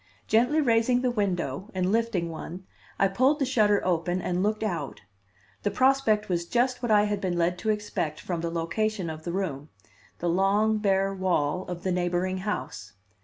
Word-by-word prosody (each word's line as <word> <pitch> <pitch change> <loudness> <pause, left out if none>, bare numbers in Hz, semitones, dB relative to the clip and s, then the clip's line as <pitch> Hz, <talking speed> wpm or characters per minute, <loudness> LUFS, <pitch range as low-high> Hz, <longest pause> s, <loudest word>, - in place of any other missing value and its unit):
Gently 250 +8 +3
raising 245 -1 +2
the 250 - +2
window, 190 - -2
and 185 0 +1
lifting 215 -7 0
one, 175 +3 -8 0.3
I 195 - +4
pulled 260 +9 +2
the 280 - 0
shutter 215 -6 +2
open 175 0 0
and 180 0 -1
looked 215 +2 0
out. 170 -9 -3 0.6
The 205 - 0
prospect 240 -1 +2
was 170 -2 -1
just 250 +3 +1
what 240 - -2
I 210 -1 +5
had 205 -1 -1
been 180 -2 -1
led 175 +1 +1
to 220 - -2
expect 210 -7 -2
from 175 -3 -3
the 170 - -2
location 170 +3 -2
of 155 0 -9
the 170 - -2
room 160 -6 -3 0.5
the 175 - -3
long, 200 +5 +2
bare 195 -1 +1
wall 185 -2 0
of 175 -1 -6
the 185 - 0
neighboring 180 +1 0
house. 185 - -5
195 Hz, 180 wpm, -27 LUFS, 175-220 Hz, 0.6 s, I